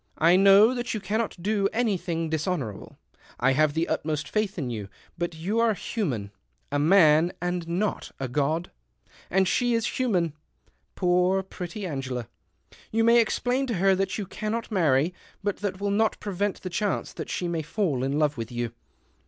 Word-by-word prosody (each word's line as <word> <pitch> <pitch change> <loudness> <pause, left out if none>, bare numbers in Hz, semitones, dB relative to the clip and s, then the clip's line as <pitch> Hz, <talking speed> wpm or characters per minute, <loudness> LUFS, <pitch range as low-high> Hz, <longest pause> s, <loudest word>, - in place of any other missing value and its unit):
I 170 +3 +5
know 200 +5 +7
that 245 -2 -3
you - - -2
cannot 210 +3 -2
do 200 +1 +1
anything 185 -8 -1
dishonourable. 155 - -3 0.4
I 135 +2 +3
have 150 +2 +2
the 165 +1 +1
utmost 150 -1 -2
faith 215 -3 -1
in 135 -7 -2
you, 105 -4 -5 0.3
but 175 -1 -3
you're 215 +7 +1
human 130 - -3 0.2
— 65 +1 -43
a 145 - +1
man, 160 0 +5
and 175 -1 -2
not 185 +5 -2
a 135 - -2
god; 150 +6 -1 0.6
and 190 +1 +3
she 245 +4 +2
is 230 +2 -1
human 180 - +1 0.3
— - - -40
poor, 180 +1 +2
pretty 190 +1 -6
Angela. 130 - -4 0.6
You 225 +1 +2
may 235 +1 +6
explain 250 +3 +1
to 235 - -1
her 195 +2 +4
that 195 +1 -1
you 205 - -3
cannot 215 +5 -4
marry, 160 -4 +2 0.3
but 205 -1 -1
that 195 -2 -3
will 200 0 -1
not 220 +2 +1
prevent 205 0 -2
the 185 - -4
chance 205 +2 -1
that - - -6
she 180 - -2
may 170 -2 -1
fall 155 - -1
in 135 +2 0
love 150 -2 +1
with 115 +1 -5
you." 120 -1 -3
180 Hz, 175 wpm, -26 LUFS, 150-210 Hz, 0.6 s, know